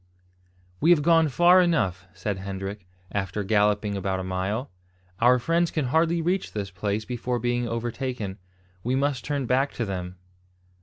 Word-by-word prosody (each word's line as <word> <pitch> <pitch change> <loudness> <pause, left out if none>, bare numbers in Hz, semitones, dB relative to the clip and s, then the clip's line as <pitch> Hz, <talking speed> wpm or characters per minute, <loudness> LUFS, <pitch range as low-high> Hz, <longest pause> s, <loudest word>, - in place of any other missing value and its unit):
"We 165 - +3
have 165 -4 +5
gone 165 0 +5
far 175 +6 +6
enough," 95 - 0
said 95 +1 -4
Hendrik, 95 0 -6 0.2
after 100 0 -2
galloping 105 0 +2
about 95 -1 -1
a - - -3
mile. 95 +7 -2 0.5
"Our 125 +2 +5
friends 165 +7 +1
can 155 -4 -1
hardly 165 +1 +2
reach 180 +3 -1
this 100 -2 -4
place 100 +3 -2
before 125 +1 -2
being 120 0 -1
overtaken. 115 -3 -3 0.4
We 125 +2 0
must 135 -2 0
turn 140 -2 -2
back 130 +3 +1
to 115 - -2
them." 90 -2 -5
115 Hz, 155 wpm, -25 LUFS, 100-145 Hz, 0.5 s, far